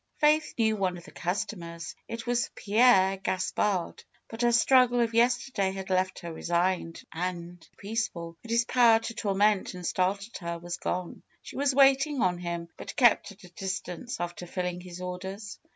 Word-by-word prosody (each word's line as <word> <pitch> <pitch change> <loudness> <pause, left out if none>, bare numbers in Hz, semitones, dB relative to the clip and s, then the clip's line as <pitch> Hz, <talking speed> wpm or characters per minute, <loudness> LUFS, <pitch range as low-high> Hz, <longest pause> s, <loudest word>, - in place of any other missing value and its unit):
Faith 300 0 +3
knew 220 -2 +2
one 185 -3 -1
of 170 - -12
the - - -13
customers; 170 -2 -4
it 230 -1 -6
was 240 -1 0
Pierre 200 -3 +4
Gas 185 -1 -2
pard. 190 -5 -1 0.3
But 225 +1 -6
her 240 0 +4
struggle 245 +1 +5
of 230 -1 +1
yesterday 240 -4 +2
had 190 0 -6
left 185 0 +1
her 170 -1 -6
re - - -9
signed 175 -1 0
and 175 0 -5
peaceful, 200 -6 -3
and 230 - -12
his 230 0 +2
power 240 -3 +5
to 225 +1 -5
torment 205 -2 +1
and 180 -1 -7
startle 200 +5 0
her 170 -2 -4
was 175 +1 -6
gone. 180 -1 -4 0.2
She - - -10
was 275 -1 +1
waiting 275 +1 +4
on 180 -4 +1
him, 170 -1 -4
but - - -8
kept 240 -4 +4
at 200 +1 -16
a 180 - -12
distance 190 +3 -5
after 175 0 -5
filling 180 0 -3
his 180 0 -9
orders. 190 +3 -6
195 Hz, 180 wpm, -28 LUFS, 180-230 Hz, 0.3 s, struggle